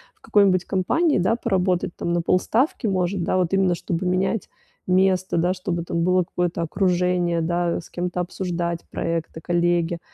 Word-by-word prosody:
в - - -36
какой-нибудь 195 -3 +3
компании, 290 - +1
да, 185 +6 +1
поработать, 185 -6 0
там, 170 - -3
на 175 0 +1
полставки, 225 - +1
может, 185 -1 0
да, 185 - 0
вот 180 0 0
именно 190 -2 +3
чтобы 170 +1 -3
менять 185 +4 0 0.4
место, 185 -1 +2
да, 175 +2 +2
чтобы 180 -2 -3
это - - -8
было 180 +2 +2
какое-то 175 0 -2
окружение, 180 -1 +1
да, 170 +1 0
с 165 - -12
кем-то 180 0 -3
обсуждать 175 -1 -2
проекты, 165 -1 -3
коллеги. 175 0 0
180 Hz, 160 wpm, -23 LUFS, 170-185 Hz, 0.4 s, какой-нибудь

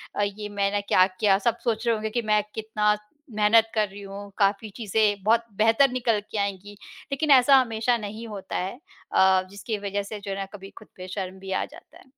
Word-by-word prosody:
अ, 205 - +1
ये 205 +1 -4
मैंने 200 0 0
क्या 185 -2 +4
किया? 195 -2 +4
सब 235 +3 0
सोच 225 -1 -1
रहे 230 - +3
होंगे 220 0 -3
कि 240 +2 -1
मैं 210 - +4
कितना 215 -1 +1 0.4
मेहनत 220 +1 +4
कर 215 -1 +2
रही 200 +1 -11
हूँ, 200 0 -9
काफ़ी 205 +2 +1
चीज़ें 210 -2 +1
बहुत 230 +3 +3
बेहतर 225 +5 +4
निकल 235 -4 +1
के 215 - -4
आएँगी। 200 0 -3 0.4
लेकिन 290 +2 0
ऐसा 270 +1 +7
हमेशा 235 -1 +1
नहीं 215 +1 -7
होता 205 -3 -7
है 185 +2 -3 0.4
अ, 190 0 +5
जिसकी 205 +2 -4
वज़ह 200 +1 -2
से 210 +1 -7
जो 200 -1 -6
है 195 - -3
ना 195 - -3
कभी 195 -1 -10
खुद - - -13
पे 185 0 -8
शर्म 190 0 -5
भी 195 0 -8
आ 190 - 0
जाता - - -16
है। - - -18
210 Hz, 215 wpm, -25 LUFS, 200-225 Hz, 0.4 s, ऐसा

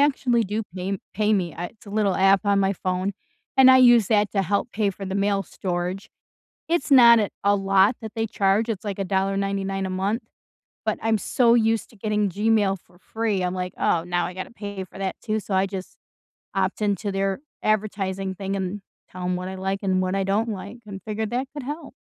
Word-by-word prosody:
actually 260 -5 +2
do 215 +3 -2
pay 185 +1 -3
m 195 - -2 0.2
pay 215 +1 +2
me, 180 -5 0
I 175 - -4
it's 215 +2 -18
a - - -9
little 205 -2 +1
app 195 +2 +4
on 200 -1 +3
my 195 0 +2
phone, 185 +1 -2 0.4
and 265 -1 +8
I 260 - +8
use 240 -5 +6
that 210 -2 +2
to 195 -2 +1
help 200 +6 -1
pay 210 -2 +1
for 195 +1 -8
the 190 +1 -3
mail 200 0 +1
storage. 180 +3 -4 0.6
It's 335 -4 0
not 235 -3 +8 0.2
a 205 0 +4
lot 195 +3 +3
that 220 -1 -7
they 225 0 0
charge, 205 +2 +1
it's 215 -2 -3
like 200 -1 -4
$1.99 195 0 -1
a - - -3
month. 195 +5 -1 0.6
But - - 0
I'm 225 -1 +2
so 235 +4 +3
used 225 -2 +1
to - - -19
getting 210 -1 0
Gmail 205 0 +2
for 175 - -24
free, 220 -2 -2
I'm 180 - -1
like, 180 0 -4
"Oh, 165 - +2
now 175 0 -1
I 180 - -7
gotta 185 - -6
pay 205 -4 -6
for 190 +1 -13
that 190 -1 -2
too," 215 -1 -1
so 205 - -6
I 190 - +3
just 190 -1 -7 0.6
opt 195 +2 0
into 205 -1 0
their 195 0 0 0.3
advertising 195 -3 -1
thing 195 +1 -3
and 190 +1 -3 0.3
tell 185 0 -8
'em 180 0 0
what 180 +1 -4
I 190 - -5
like 190 +1 -2
and 185 -1 +1
what 185 +1 -1
I 195 - +1
don't 210 +4 0
like, 205 +2 -6
and 195 -1 -7
figured 215 0 -3
that 250 +2 -1
could 290 - -5
help. 295 +5 -6
200 Hz, 220 wpm, -24 LUFS, 190-220 Hz, 0.6 s, and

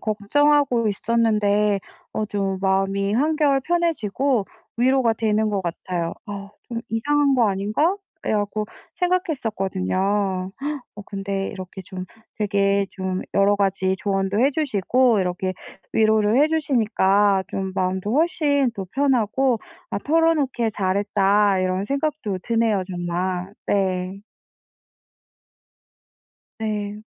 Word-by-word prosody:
걱정하고 245 +3 +2
있었는데 210 -2 +2 0.3
어 215 - -1
좀 195 -2 -2
마음이 195 +1 +1
한결 290 0 +2
편해지고 275 - 0 0.3
위로가 250 -1 +3
되는 215 -1 +1
것 200 -2 0
같아요. 170 -1 -3
'아 200 -1 -7 0.2
좀 230 -1 -3
이상한 280 +5 +2
거 235 -4 +4
아닌가?' 215 - +1 0.3
그래 - - -1
갖고 210 +1 -1 0.3
생각했었거든요. 230 - -1 1.0
어 205 - -8
근데 195 -1 -3
이렇게 185 0 -8
좀 185 0 -7 0.3
되게 200 -1 +2
좀 190 -1 -3
여러 200 +1 +4
가지 190 -1 +1
조언도 195 +1 0
해 270 +3 +4
주시고 255 - +2
이렇게 185 0 -1 0.4
위로를 220 +2 +3
해 - - +5
주시니까 210 -10 +2
좀 190 -1 -3
마음도 190 +3 -1
훨씬 290 -4 +2
더 195 -3 -5
편하고 260 -2 +2 0.3
'아 - - -1
털어놓길 290 -6 +2
잘했다.' 200 0 +2
이런 185 +1 0
생각도 275 -7 -2
드네요, 230 -3 +2
정말. 180 +1 -3
네. 190 -1 0 2.4
네. 210 -1 -3
210 Hz, 245 characters per minute, -23 LUFS, 195-255 Hz, 2.4 s, 해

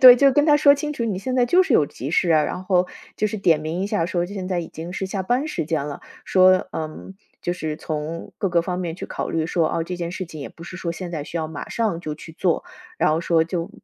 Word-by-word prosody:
对， 250 -1 +11
就 275 +1 +5
跟 290 +3 +3
他 295 -2 +6
说 285 -1 +7
清 295 +1 -3
楚， 235 - -2
你 200 -5 -1
现 255 +6 -3
在 245 - +5
就 360 +10 +5
是 280 -10 +1
有 150 - +5
急 140 0 -6
事 175 0 +2
啊， 155 -2 +5
然 180 - -4
后 185 -1 +2 0.3
就 215 - +1
是 215 +1 -3
点 165 -6 +3
名 160 +4 -2
一 195 - 0
下 205 -6 0
说 175 -1 0
现 190 0 -5
在 180 - 0
已 165 - -6
经 165 +2 -7
是 190 - -2
下 190 0 -3
班 245 +9 +1
时 305 - -3
间 160 -3 0
了。 145 - -6 0.2
说， 185 0 +5
嗯 160 +4 -6 0.3
就 175 - 0
是 160 -4 -3
从 155 +1 -5
各 195 - +1
个 170 -1 +2
方 180 0 -3
面 170 -2 -3
去 - - -6
考 - - -4
虑 160 -1 0
说， 165 0 +1
哦， 165 - -1
这 180 +2 -4
件 170 -1 -3
事 185 +1 -4
情 160 -2 -9
也 140 - -5
不 165 - -13
是 185 +2 -8
说 170 -2 -2
现 175 0 -6
在 150 -4 -4
需 170 - -6
要 160 - -1
马 155 -2 -7
上 215 -7 -1
就 155 -3 -4
去 160 +2 -11
做， 170 - 0 0.3
然 - - +3
后 160 - +1
说 165 -1 +3
就， 170 0 -3
175 Hz, 305 characters per minute, -23 LUFS, 160-195 Hz, 0.3 s, 对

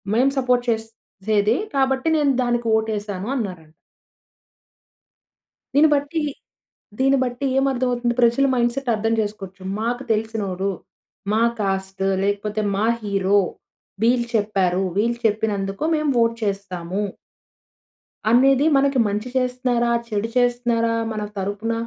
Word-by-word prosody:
మేము 260 +4 +3
సపోర్ట్ 250 -2 +2
చేసేది, 220 -1 -1 0.2
కాబట్టి 265 +1 +1
నేను 290 -2 +3
దానికి 240 -1 0
వోట్ 220 0 +1
వేసాను 205 0 -5
అన్నారంట. 180 -9 -5 2.0
దీన్ని 305 +2 +6
బట్టి 290 +3 -1 0.8
దీన్ని 270 +1 +4
బట్టి 245 +2 -4
ఏం 270 - +3
అర్థం 255 0 -1
అవుతుంది 240 -1 0
ప్రజల 235 +3 +4
మైండ్‌సెట్ 245 +2 0
అర్థం 225 +1 0
జేసుకోచ్చు. 200 -3 -6 0.2
మాకు 240 +3 -2
తెలిసినోడు 210 -3 -1 0.6
మా 220 - +2 0.2
క్యాస్టు, 195 -1 -2 0.2
లేకపోతే 205 +1 -1
మా 205 +2 +1 0.2
హీరో, 200 -1 +2 0.6
వీళ్ళు 235 +1 +3
చెప్పారు. 195 -4 +1 0.2
వీళ్ళు 235 +3 +1
చెప్పినందుకు 205 -1 -2
మేము 305 -2 +1
ఓట్ 230 0 0
చేస్తాము. 195 -2 -3 1.3
అనేది 265 +4 +5
మనకి 275 -1 +2
మంచి 210 +3 -2
చేస్తున్నారా? 250 -2 0 0.2
చెడు 210 0 -1
చేస్తున్నారా? 240 -2 +1 0.2
మన 215 - -4 0.2
తరపున 205 +4 -2
225 Hz, 115 wpm, -22 LUFS, 205-250 Hz, 2.0 s, దీన్ని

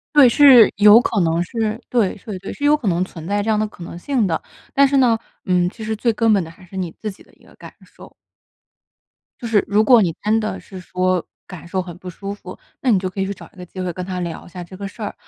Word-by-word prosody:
对， 280 -4 +8
是 260 -4 +7
有 210 +3 +8
可 225 - -1
能 165 0 +1
是， 220 +4 -3
对 230 -6 +1
对 210 -4 -6
对， 190 +2 -7
是 - - -9
有 295 +1 +4
可 250 - -5
能 175 -1 +1
存 165 -4 -9
在 205 +1 0
这 215 - -3
样 215 -1 +2
的 215 - +1
可 185 -4 -12
能 170 - -8
性 235 +2 0
的。 165 - -1 0.3
但 280 0 +4
是 275 +1 +1
呢， 245 -4 +4 0.3
嗯， 180 -2 +2
其 225 - -10
实 220 0 -2
最 230 +2 0
根 225 0 +2
本 200 -4 +3
的 165 - -10
还 165 - -18
是 185 +1 -11
你 180 -3 -3
自 215 - -6
己 195 - -12
的 - - -25
一 - - -26
个 - - -20
感 - - -13
受。 - - -16 1.3
就 240 - -5
是 215 -3 +2
如 205 +2 +3
果 235 +1 +6
你 170 -5 0
真 215 +2 +2
的 215 -1 -3
是 190 - -11
说， 185 -1 -1 0.2
感 175 -2 -11
受 185 +1 -2
很 175 -2 -9
不 180 0 -9
舒 195 +3 -6
服， 185 -2 -11 0.2
那 260 - 0
你 215 - +5
就 185 0 -2
可 190 - -9
以 195 - +1
去 200 - -3
找 190 - -13
一 - - -23
个 180 - -9
机 185 - -11
会 180 -1 -2
跟 180 +2 -6
他 185 -1 -4
聊 170 -1 -6
一 - - -14
下 180 +1 -8
这 185 +2 -12
个 200 +1 -5
事 210 - -13
儿。 205 - -4
200 Hz, 305 characters per minute, -20 LUFS, 180-225 Hz, 1.3 s, 对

